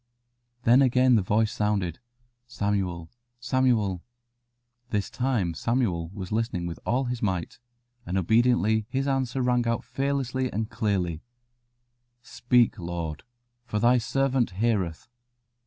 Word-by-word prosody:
Then 120 +4 +6
again 130 -1 +4
the 110 - +4
voice 105 +3 +1
sounded: 100 -5 -1 0.5
"Samuel, 100 -7 -2 0.3
Samuel." 120 -7 +1 0.9
This 105 -4 -2
time 120 -10 0
Samuel 95 -7 -1
was 95 -2 -7
listening 110 -5 -1
with 85 -1 -5
all 125 +4 +2
his 125 -2 -3
might, 95 -2 -2 0.4
and 95 -3 -3
obediently 110 +2 +2
his 135 +2 -1
answer 135 -1 0
rang 125 -1 +1
out 115 0 0
fearlessly 135 -2 -2
and 110 +1 -3
clearly 95 -8 -1 1.0
"Speak, 120 -2 +2
Lord, 85 -3 -4 0.5
for 105 - -2
Thy 120 +3 +4
servant 135 +1 +1
heareth." 100 -7 0
115 Hz, 120 wpm, -26 LUFS, 95-125 Hz, 1.0 s, Then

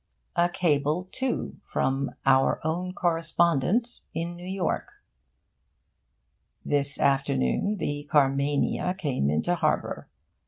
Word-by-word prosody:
A 175 0 +3
cable, 160 0 0
too, 260 -1 -2
from 135 +1 -1
'Our 135 0 +4
Own 175 +3 -1
Correspondent' 170 - +1 0.2
in 170 +1 -3
New 175 +1 -9
York: 190 -2 -2 1.7
This 140 -1 +2
afternoon 135 - +1
the 145 -3 -4
Carmania 145 +4 +2
came 130 - 0
into 75 - +1
harbour. 175 - -1
160 Hz, 95 wpm, -27 LUFS, 140-180 Hz, 1.7 s, Our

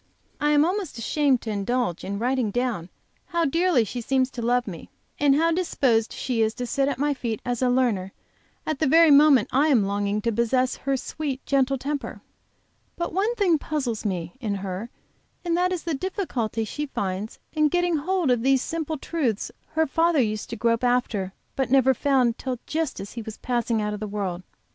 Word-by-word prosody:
I 295 -1 +2
am 295 0 +5
almost 365 - -2
ashamed 270 +2 +1
to 220 - -4
indulge 205 -2 -1
in 200 +1 -3
writing 245 0 0
down 230 -6 -2 0.4
how 340 -1 0
dearly 330 -3 +3
she 240 +3 -5
seems 260 +2 +1
to 240 - -6
love 245 +1 +1
me, 175 -6 -8 0.3
and 285 -1 +4
how 330 +3 +3
disposed 265 -10 +1
she 245 -3 -2
is 220 0 +1
to 250 - -3
sit 275 +3 0
at 280 -3 -1
my 290 +2 +1
feet 235 -5 -3
as 245 -1 -2
a 255 - +3
learner 235 -7 +1 0.5
at 310 -3 -2
the 310 - +2
very 325 +2 +6
moment 280 -5 +6
I 280 +4 +3
am 255 -9 +4
longing 200 +1 -1
to 230 - +1
possess 240 +3 +1
her 275 0 -1
sweet, 275 0 -4
gentle 275 -1 +2
temper. 285 +2 -4 0.8
But 340 - -3
one 415 +6 +1
thing 360 -8 +3
puzzles 265 -9 -2
me, 175 -5 -3
in 215 -6 -2
her, 195 +3 -5 0.6
and 340 -1 +1
that 360 +1 +2
is 360 -3 -2
the 335 - -2
difficulty 270 - -2
she 295 +7 -4
finds 200 -3 -4 0.2
in 305 -1 +3
getting 350 +1 +1
hold 345 -1 0
of 245 -2 +2
these 265 +1 +3
simple 320 -1 -3
truths 265 -9 -2 0.2
her 320 +1 +3
father 330 +2 +2
used 215 -4 -1
to 230 - -4
grope 230 +2 +1
after 245 -6 +1 0.2
but 265 -2 -1
never 265 0 +5
found 255 -3 +1
till 255 -2 -3
just 315 -3 -2
as 200 - -7
he 235 - -6
was 220 -1 -8
passing 235 -3 -1
out 210 0 -2
of 210 - -5
the 215 - -4
world. 195 -4 -3
255 Hz, 200 wpm, -25 LUFS, 225-300 Hz, 0.8 s, very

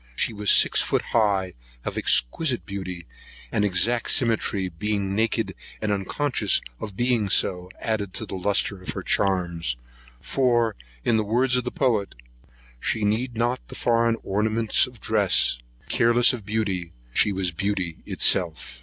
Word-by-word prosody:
She - - 0
was 105 -1 -1
six - - +6
feet - - 0
high, 100 -5 +2 0.3
of - - -3
exquisite 120 - +1
beauty, 95 -3 -6 0.5
and 105 - +1
exact 105 +5 +2
symmetry, 110 -5 +1
being 100 +2 -2
naked, 110 +2 0 0.3
and 105 - -1
unconscious 105 +2 0 0.2
of - - -5
her 100 - -17
being 120 -3 +1
so, 90 -1 +2
added 105 -4 -2
a 110 -4 -7
lustre 100 0 0
to - - -4
her - - -5
charms; 85 -9 0 0.4
for, 120 - +1 0.3
in 110 - +3
the 110 - +1
words 125 +4 +2
of 125 -1 0
the 125 - -2
poet, 115 -7 0 0.6
"She 110 - -1
needed 115 +3 -1
not 120 +2 0
the - - -10
foreign 115 -1 +2
ornaments 110 +5 +2
of 125 -3 -14
dress; 100 - +3 0.3
careless 120 +2 +4
of 110 -5 -7
beauty, 100 -6 -2 0.2
she 105 - +3
was 95 -2 -1
beauty's 95 -1 -3 0.2
self." 80 -9 +1
105 Hz, 150 wpm, -24 LUFS, 95-115 Hz, 0.6 s, six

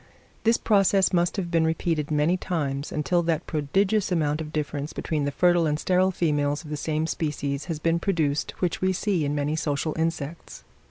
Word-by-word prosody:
This 230 +1 +4
process 195 -3 +3
must 175 +3 +1
have 175 -3 -3
been 165 -2 +3
repeated 160 -2 0
many 150 +3 +2
times, 150 -6 -3
until 155 +4 +1
that 165 -1 -1
prodigious 190 +7 0
amount 155 -3 +1
of 155 -1 -6
difference 150 -1 -3
between 150 -3 -2
the 145 - -1
fertile 175 +1 +3
and 150 0 0
sterile 185 +2 +2
females 145 -4 0
of 150 - -10
the - - -1
same 155 +1 -1
species 145 -3 -2
has 165 -3 -3
been 165 +2 +1
produced 155 -6 0
which 180 -2 -1
we 185 0 +2
see 185 -3 0
in 145 +1 -1
many 145 +1 0
social 150 0 -1
insects. 165 -1 -3
160 Hz, 185 wpm, -25 LUFS, 150-175 Hz, -, This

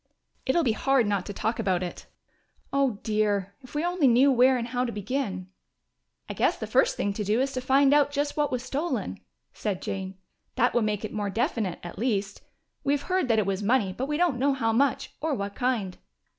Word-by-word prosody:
"It'll 330 +6 +3
be 245 - +2
hard 265 +2 +2
not 200 -3 -1
to - - -4
talk 220 +4 -2
about 185 -2 +1
it. 175 - -7 0.7
Oh, 275 -6 +2
dear, 205 -2 0
if 255 +2 -14
we 300 +3 0
only 350 -5 +2
knew 255 +3 +5
where 255 +1 +5
and 235 0 -4
how 250 +1 0
to 245 - -2
begin!" 205 -3 -3 0.8
"I - - -4
guess - - +1
the - - -4
first - - +2
thing 200 - 0
to 210 - -3
do 210 +4 +1
is 270 +1 0
to 255 - -2
find 270 +2 +4
out 290 -1 +4
just 285 0 -2
what 295 -1 0
was 250 -1 -2
stolen," 295 +6 -3 0.3
said 200 -4 -3
Jane. 190 0 -5 0.4
"That 245 - +2
would 240 -3 +2
make 210 0 -1
it - - -7
more 205 -1 -2
definite, 220 - -1
at 175 +1 -8
least. 205 -5 -1 0.4
We 280 0 +2
have 285 -1 -1
heard 370 -7 +2
that 225 -2 +3
it 215 - +2
was 195 0 -1
money, 205 -3 +2
but 260 +7 -3
we 295 0 -1
don't 335 -7 +1
know 280 +2 +3
how 230 -4 0
much 260 +3 +1
or 310 -2 0
what 200 -2 -4
kind." 225 -6 -1
240 Hz, 220 wpm, -27 LUFS, 205-275 Hz, 0.8 s, knew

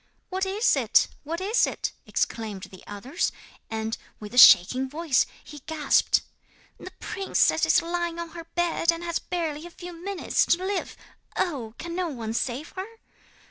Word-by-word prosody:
'"What 380 0 -1
is 410 +5 +2
it? - - +3
What 325 +3 -4
is 425 +6 +3
it?" - - -3 0.2
exclaimed 215 -4 -2
the 185 - -11
others; 240 - -2 0.4
and, 220 0 -3 0.2
with 210 0 -9
a - - -5
shaking 255 +7 +8
voice, 305 -2 +1 0.2
he 295 - -11
gasped: 315 -2 +3 0.6
'"The - - -8
princess 390 0 +1
is 350 - +4
lying 345 0 -2
on 340 0 -5
her 335 0 -9
bed, 345 -1 +2
and 335 +1 -6
has 340 -1 -1
barely 330 -2 -3
a - - -11
few 350 +1 -9
minutes 365 +3 0
to 360 +2 +2
live. 400 0 -3 0.4
Oh! 250 -11 -2
can 340 0 -6
no 365 -1 0
one 230 -7 -4
save 255 +6 -2
her?" 380 +1 -6
335 Hz, 165 wpm, -26 LUFS, 255-350 Hz, 0.6 s, shaking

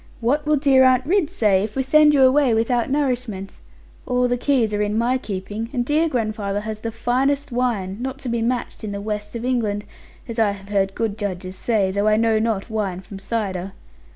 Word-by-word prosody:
What 285 +6 0
will 305 - +4
dear 270 -2 +4
Aunt 255 0 +4
Ridd 345 -1 +2
say, 210 - +2
if 210 0 -5
we 265 - 0
send 295 +2 +5
you 270 - +5
away 260 -2 +4
without 235 +2 +1
nourishment? 250 -8 -2 0.5
All 250 0 +2
the 245 - +1
keys 245 -4 +1
are 205 - 0
in 210 +1 0
my 245 +3 +1
keeping, 205 +2 -5
and 245 -2 0
dear 310 +4 +2
grandfather 215 -5 -2
has 215 0 -6
the 230 - -3
finest 270 +5 0
wine, 225 -6 -1
not 265 +1 -4
to - - -4
be 235 0 -1
matched 240 0 -2
in 210 -2 -4
the 200 - -4
west 210 +1 -5
of 235 +1 -4
England, 215 -5 -1 0.4
as 230 -1 -4
I 210 -3 +3
have 200 0 -12
heard 195 -1 0
good 220 -2 -2
judges 185 -2 -4
say; 200 -2 +1
though 200 +2 0
I 215 0 +4
know 225 -1 +2
not 220 -3 -1
wine 205 -5 -3
from 195 0 -10
cider. 195 -3 -3
225 Hz, 210 wpm, -22 LUFS, 205-255 Hz, 0.5 s, send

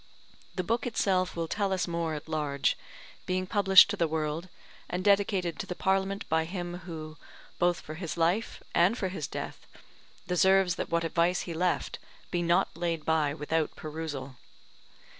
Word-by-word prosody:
The 185 - -1
book 230 +6 0
itself 185 -5 +1
will 165 -1 -2
tell 200 +2 -1
us 185 -1 0
more 170 -2 -1
at 150 - -7
large, 150 -3 0 0.5
being 185 0 0
published 195 0 +7
to - - -1
the 170 -4 +1
world, 160 +2 -2 0.4
and 180 +1 -2
dedicated 195 -4 +2
to - - -4
the 180 - -4
Parliament 195 +1 0
by 160 0 +2
him 175 0 -5
who, 155 -1 -7 0.4
both 175 -1 +2
for 155 - -8
his 165 -1 -5
life 175 +7 0
and 185 +7 +4
for 190 - -1
his 160 -7 -4
death, - - -6 0.6
deserves 190 0 +4
that - - -4
what 170 0 +1
advice 170 +2 +2
he 170 - -5
left 180 +2 -1 0.3
be 175 - 0
not 175 +1 +2
laid 165 -2 -2
by 155 -3 +2
without 155 +1 -1
perusal. 150 -4 -6
175 Hz, 165 wpm, -29 LUFS, 160-190 Hz, 0.6 s, published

